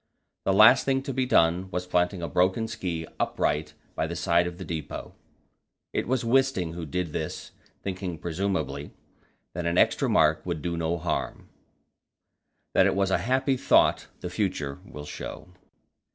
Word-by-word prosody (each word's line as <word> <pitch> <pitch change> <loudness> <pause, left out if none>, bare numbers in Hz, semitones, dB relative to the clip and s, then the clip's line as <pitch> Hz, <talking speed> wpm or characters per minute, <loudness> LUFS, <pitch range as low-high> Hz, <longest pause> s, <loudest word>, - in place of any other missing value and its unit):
The - - +3
last 110 +6 +7
thing 135 -1 +1
to 135 -1 -4
be 130 0 0
done 90 -4 +3
was 90 0 -3
planting 90 0 0
a - - -1
broken 95 +5 +1
ski 90 -7 -4
upright 75 +1 -1 0.2
by 80 - -1
the 85 - -5
side 85 0 +2
of 90 -1 -6
the 95 - -7
depot. 80 -4 -5 0.8
It - - -1
was 125 -1 0
Wisting 115 -9 +2
who 85 -2 -6
did 85 +1 -3
this, 80 - -4 0.3
thinking, 95 -3 -4
presumably, 85 -4 -3 0.6
that 85 0 -3
an 85 +1 0
extra - - +3
mark 75 0 +3
would 85 -5 -4
do 85 -1 -1
no 85 +1 -1
harm. 80 - -3 1.2
That - - +5
it - - +1
was 95 -1 +1
a - - +3
happy 130 +2 +1
thought - - +3
the 90 - -5
future 90 -8 -2
will 75 0 -9
show. 90 - -7
90 Hz, 165 wpm, -27 LUFS, 80-100 Hz, 1.2 s, last